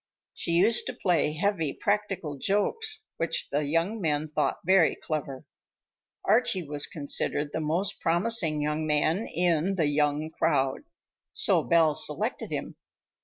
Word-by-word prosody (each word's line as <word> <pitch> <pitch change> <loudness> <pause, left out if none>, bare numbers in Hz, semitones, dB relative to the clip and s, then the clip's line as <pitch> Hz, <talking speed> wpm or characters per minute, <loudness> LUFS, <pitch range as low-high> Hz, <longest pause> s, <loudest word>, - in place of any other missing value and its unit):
She 170 - -2
used 205 +7 +3
to - - -3
play 165 -5 +1
heavy 165 -3 -1
practical 200 -9 -2
jokes 435 - 0
which 165 - -1
the 145 +1 0
young 165 +9 -1
men 155 -2 -1
thought 150 - -1
very 185 -2 +4
clever. 140 -4 -5 0.8
Archie 200 - +2
was 145 0 -1
considered 145 0 -1
the - - -1
most 165 +6 -1
promising 170 -3 +2
young 150 +1 -2
man 155 +7 +1
in 175 +2 0
"the 165 -4 +1
young 150 +1 0
crowd," 145 - 0 0.5
so - - +2
Belle 165 -2 +3
selected - - -1
him. - - -5
165 Hz, 135 wpm, -27 LUFS, 150-195 Hz, 0.8 s, very